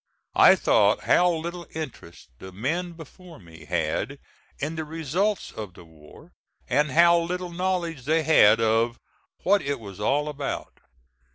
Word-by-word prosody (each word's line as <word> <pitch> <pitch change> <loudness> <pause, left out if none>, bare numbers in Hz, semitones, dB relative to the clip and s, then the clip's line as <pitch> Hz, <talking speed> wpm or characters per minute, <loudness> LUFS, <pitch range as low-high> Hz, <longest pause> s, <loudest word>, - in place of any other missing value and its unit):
I - - +8
thought - - +2
how 180 0 +4
little 170 +1 -5
interest 135 - -8
the 95 - -10
men 165 - -3
before 165 +1 -13
me 80 -3 -15
had 85 - -2 0.4
in 150 +3 -3
the 160 - -3
results 165 +7 -2
of 105 -5 -8
the 85 - -14
war, 75 -2 -17 0.4
and 150 +4 +1
how 170 +4 +5
little 180 +1 -4
knowledge 170 -6 -2
they 160 +2 +1
had 115 -9 +5
of 115 +1 +1 0.5
"what 200 +1 +3
it 140 -1 -3
was 100 -3 -11
all 140 +8 0
about." 145 -2 -5
150 Hz, 150 wpm, -25 LUFS, 110-170 Hz, 0.5 s, I